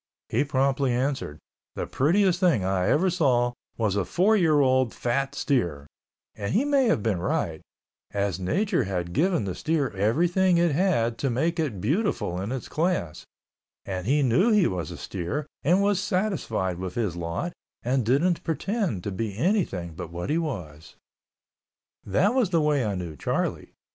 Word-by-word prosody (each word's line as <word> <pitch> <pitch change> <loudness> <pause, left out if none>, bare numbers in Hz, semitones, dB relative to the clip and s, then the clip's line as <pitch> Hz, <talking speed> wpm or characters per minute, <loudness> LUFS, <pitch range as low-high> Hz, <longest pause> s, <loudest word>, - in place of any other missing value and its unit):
He - - +2
promptly 135 -1 +1
answered, 130 - -2 0.4
"The - - -3
prettiest 180 +5 +2
thing 165 - +3
I 95 -1 +1
ever 175 +7 +3
saw 125 -8 +2 0.2
was 110 -4 0
a 100 - +1
four 185 - +2
year 160 -7 +3
old 130 -3 +2
fat 135 +3 -1
steer," 85 - 0 0.5
and 100 - -3
he 250 +7 +3
may 280 -2 +3
have 220 - +1
been 105 -6 0
right, 85 -3 -1 0.5
as 100 -2 -1
nature 170 - 0
had 90 -3 -3
given 170 - +1
the 95 - -3
steer 155 - -1
everything 170 - +2
it 170 -1 +3
had 140 -9 +1
to 135 - 0
make 160 +8 0
it 135 - -1
beautiful 150 - -1
in 100 +5 -4
its 130 -2 -4
class, 155 - -2 0.6
and 95 0 -4
he 145 +2 +3
knew 130 - +3
he 210 -4 +4
was 90 -5 -2
a - - -7
steer 100 - -4 0.2
and 180 +7 +3
was 200 -2 +2
satisfied 185 - -1
with 95 -1 -5
his 105 -8 -1
lot 85 - -3 0.3
and 130 +1 +1
didn't 150 +10 +2
pretend 175 - -2
to 100 - -3
be 100 +1 -4
anything 120 - 0
but 85 0 -7
what 85 - -4
he 155 - +2
was. 80 - -6 1.1
That 185 - +2
was 250 -7 +2
the 170 -2 +2
way 150 -3 +2
I 105 -3 -1
knew 85 -4 -5
Charlie. 65 - -2
130 Hz, 170 wpm, -26 LUFS, -, 1.1 s, he